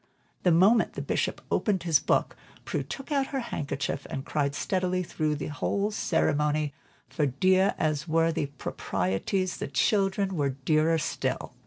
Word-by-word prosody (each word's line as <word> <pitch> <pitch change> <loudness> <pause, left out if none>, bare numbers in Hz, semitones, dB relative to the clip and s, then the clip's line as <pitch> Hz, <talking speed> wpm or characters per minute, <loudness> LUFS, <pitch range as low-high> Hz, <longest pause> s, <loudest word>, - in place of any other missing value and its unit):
The 180 - +3
moment 195 +7 +4
the - - -4
Bishop - - -1
opened 195 -5 +1
his 165 -4 +4
book, - - +1 0.3
Prue - - -1
took 270 +2 -7
out 275 -2 +1
her 275 - -2
handkerchief 145 - -3
and 135 - -4
cried 145 -2 -1
steadily 185 -1 0
through 155 -3 -1
the 145 - -4
entire 200 +7 -1
ceremony, 150 -5 +1 0.3
for 150 -4 0
dear 185 +8 +3
as 155 0 -1
were 165 +1 +3
the 150 -2 -1
proprieties, 135 - -2
the - - -4
"children" 195 - +1
were 145 -4 +1
dearer 155 +4 +2
still. 155 - -2
165 Hz, 155 wpm, -28 LUFS, 145-190 Hz, 0.3 s, moment